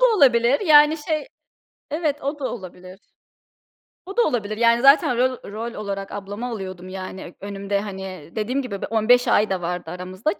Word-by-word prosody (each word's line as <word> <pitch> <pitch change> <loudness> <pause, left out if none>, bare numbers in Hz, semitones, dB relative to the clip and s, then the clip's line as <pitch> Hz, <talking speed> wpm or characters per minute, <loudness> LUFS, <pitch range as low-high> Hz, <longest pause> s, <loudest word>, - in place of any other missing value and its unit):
da - - +5
olabilir, 255 -3 +4
yani, 305 -3 +6
şey 310 +7 -3 0.6
Evet, 300 -2 -1
o 285 +2 -3
da 275 - -6
olabilir. 185 -3 -10 1.1
O 390 +4 -9
da - - +6
olabilir, 215 - -1
yani, 235 0 +4
zaten 275 -3 +5
rol 255 -4 -1
rol 225 +3 -5
olarak 195 -1 -5
ablamı 205 +4 -6
alıyordum, 185 -5 -6
yani, 185 -1 -8
önümde, 200 0 -3
hani, 190 -5 -7
dediğim 245 +6 -1
gibi 200 -7 -6
bir - - -3
15 240 +3 +4
ay 210 0 +3
da 185 -2 -1
vardı 175 -1 -4
aramızda 185 - -3
k - - -24
215 Hz, 175 wpm, -22 LUFS, 190-270 Hz, 1.1 s, yani